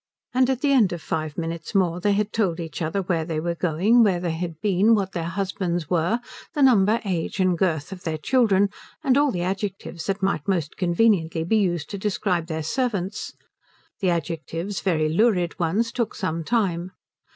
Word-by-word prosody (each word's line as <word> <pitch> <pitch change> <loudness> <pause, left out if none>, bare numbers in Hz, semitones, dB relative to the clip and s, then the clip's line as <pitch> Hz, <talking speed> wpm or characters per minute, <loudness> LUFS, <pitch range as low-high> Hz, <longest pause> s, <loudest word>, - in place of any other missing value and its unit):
And 255 0 +3
at 260 -2 0
the 290 -2 +2
end 235 -9 +4
of 170 - -6
five 155 -2 -3
minutes 165 +3 -4
more 180 -3 +2
they 205 +3 +2
had 210 +1 -1
told 190 -7 0
each 165 0 -6
other 165 +5 -1
where 170 -3 0
they 160 -1 -3
were 170 +2 -1
going, 180 +8 +3
where 195 -6 +3
they 175 -1 -2
had 165 -1 -4
been, 205 +3 +3
what 195 -2 -1
their 170 -3 -3
husbands 185 -4 -2
were, 175 +7 +2 0.4
the 290 - +3
number, 225 -3 +4
age, 185 0 -2
and 185 -1 +3
girth 165 -4 -1
of 190 -2 -7
their 160 -2 -2
children, 205 - +3 0.3
and 265 -4 +3
all 285 +1 +4
the 180 -8 -2
adjectives 190 -3 -4
that 195 0 -2
might 190 -6 0
most 175 -6 -1
conveniently 175 -3 +2
be 220 +7 +2
used 175 -6 0
to 200 - -4
describe 185 -4 -1
their 160 -2 -3
servants. 205 - -2 0.7
The 190 - +1
adjectives, 170 +3 -3
very 160 -5 +1
lurid 180 0 +1
ones, 200 +8 +1
took 235 -2 -2
some 165 -3 -2
time. 185 -4 0
185 Hz, 190 wpm, -24 LUFS, 165-210 Hz, 0.7 s, end